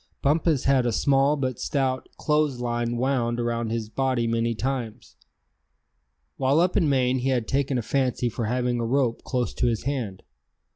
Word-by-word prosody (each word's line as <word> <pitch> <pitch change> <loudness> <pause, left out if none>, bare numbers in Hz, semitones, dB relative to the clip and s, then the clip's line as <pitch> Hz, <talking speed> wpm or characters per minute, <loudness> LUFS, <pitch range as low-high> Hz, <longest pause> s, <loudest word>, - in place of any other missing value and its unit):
Bumpus 150 0 +2
had 135 -2 +3
a - - +1
small 140 +4 +2
but 130 -4 -2
stout 130 -2 -1
clothes 150 -4 +1
line 120 0 -1
wound 120 -2 0
around 120 -1 -1
his 115 -1 -2
body 130 +1 0
many 115 0 0
times. 125 -2 -4 1.2
While 135 +3 +2
up 180 +1 +2
in 155 - +3
Maine 130 -1 +2
he 130 +2 -1
had 125 -4 0
taken 135 -1 0
a 120 - -2
fancy 125 0 0
for 115 0 -3
having 125 +1 0
a - - -1
rope 125 -2 +1
close 125 -2 -2
to - - 0
his 115 -2 -1
hand. 125 -9 -3
125 Hz, 175 wpm, -25 LUFS, 120-135 Hz, 1.2 s, had